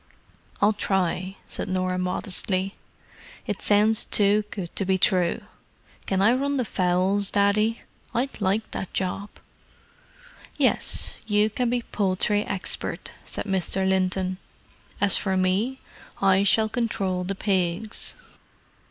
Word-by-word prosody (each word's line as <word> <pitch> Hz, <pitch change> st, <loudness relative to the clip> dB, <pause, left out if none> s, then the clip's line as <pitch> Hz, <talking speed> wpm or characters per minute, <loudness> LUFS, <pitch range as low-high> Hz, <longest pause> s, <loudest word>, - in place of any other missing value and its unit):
"I'll 210 Hz, +2 st, +5 dB
try," 190 Hz, -2 st, -1 dB
said -, -, -5 dB
Norah 185 Hz, 0 st, 0 dB
modestly. 185 Hz, +1 st, -1 dB, 0.7 s
"It -, -, -3 dB
sounds 215 Hz, +2 st, +4 dB
too 205 Hz, 0 st, +3 dB
good 180 Hz, -4 st, -6 dB
to -, -, +1 dB
be 190 Hz, 0 st, +2 dB
true. 180 Hz, +3 st, +2 dB, 0.7 s
Can 190 Hz, 0 st, +1 dB
I 225 Hz, +4 st, +5 dB
run 280 Hz, +2 st, 0 dB
the 250 Hz, -, 0 dB
fowls, 185 Hz, +1 st, +1 dB
Daddy? 210 Hz, +3 st, +2 dB, 0.3 s
I'd 250 Hz, -1 st, -2 dB
like 205 Hz, +3 st, 0 dB
that 190 Hz, -, -5 dB
job." 195 Hz, +2 st, -2 dB, 1.3 s
"Yes, -, -, +1 dB
you 210 Hz, 0 st, +3 dB
can 245 Hz, +2 st, 0 dB
be 245 Hz, 0 st, 0 dB
poultry 205 Hz, 0 st, +1 dB
expert," 190 Hz, -3 st, -4 dB
said -, -, -5 dB
Mr. 190 Hz, -1 st, 0 dB
Linton. 185 Hz, 0 st, 0 dB, 0.6 s
"As 205 Hz, -1 st, +4 dB
for 190 Hz, -2 st, 0 dB
me, 195 Hz, +8 st, +1 dB, 0.4 s
I 195 Hz, -1 st, +4 dB
shall 220 Hz, +2 st, +4 dB
control 200 Hz, -6 st, -1 dB
the 195 Hz, +2 st, -3 dB
pigs." 190 Hz, +1 st, -1 dB
195 Hz, 125 wpm, -25 LUFS, 185-215 Hz, 1.3 s, I'll